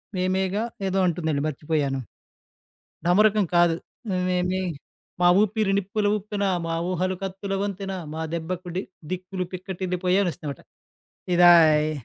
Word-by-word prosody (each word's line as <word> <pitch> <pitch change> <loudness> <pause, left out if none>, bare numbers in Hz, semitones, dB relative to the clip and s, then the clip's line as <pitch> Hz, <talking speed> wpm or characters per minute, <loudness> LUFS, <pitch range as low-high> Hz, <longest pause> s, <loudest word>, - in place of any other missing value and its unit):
మేమేగా 190 +3 0 0.2
ఏదో 190 +1 0
అంటుందండి 160 -4 -1
మర్చిపోయాను. 145 -2 -1 1.1
ఢమరుకం 210 +3 +4
కాదు. 170 -1 +4 0.5
మేమే 180 +1 0 0.6
మా 175 - +6
ఊపిరి 210 -1 +1
నిప్పులు 205 +2 -1
ఊప్పెన. 205 0 -3 0.2
మా 165 - -1 0.2
ఊహలు 185 +1 0
కత్తుల 195 +1 -4
వంతెన. 195 -1 -3 0.2
మా 160 - -3
దెబ్బకు 175 +2 -4
డి 190 - 0 0.3
'దిక్కులు 185 0 -3
పిక్కటిల్లి 185 -1 -4
పోయే' 185 +2 +3
అనొస్తుందన్నమాట. 155 -5 -4 0.7
ఇదా 175 0 +8 0.4
ఈ - - -1
185 Hz, 120 wpm, -25 LUFS, 175-195 Hz, 1.1 s, ఇదా